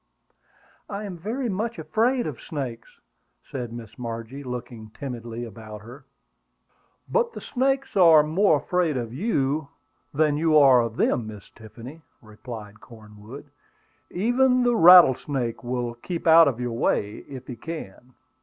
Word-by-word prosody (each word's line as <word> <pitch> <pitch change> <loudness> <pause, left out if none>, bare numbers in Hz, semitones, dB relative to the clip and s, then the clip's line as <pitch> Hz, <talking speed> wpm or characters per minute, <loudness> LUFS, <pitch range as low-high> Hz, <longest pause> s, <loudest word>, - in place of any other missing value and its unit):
"I 200 0 -5
am 195 -3 -6
very 225 +10 -4
much 225 +3 -3
afraid 245 +3 0
of 150 -6 -6
snakes," 130 -8 -7 0.4
said 125 -3 -6
Miss 115 0 -10
Margie, 115 +3 -6
looking 120 -3 -7
timidly 120 -3 -6
about 110 -1 -11
her. 125 +6 -13 1.0
"But 480 -1 0
the - - -7
snakes 270 +1 -1
are 165 -5 +7
more 160 +2 +2
afraid 160 0 -1
of 115 -2 -5
you 145 - -1 0.4
than 150 0 +1
you 155 0 +3
are 135 -4 +6
of 115 -1 -4
them, 115 -3 0
Miss 105 -2 -11
Tiffany," 115 +7 -12 0.2
replied 110 -1 -11
Cornwood. 110 +5 -13 0.6
"Even 250 +6 +2
the 245 -1 +2
rattlesnake 145 - +5
will 120 -1 -3
keep 165 +8 -6
out 165 -1 +7
of 125 -4 -1
your 120 -1 -3
way, 105 -2 -1
if 130 -2 -9
he 125 - -7
can." 125 -3 -9
135 Hz, 140 wpm, -24 LUFS, 115-175 Hz, 1.0 s, are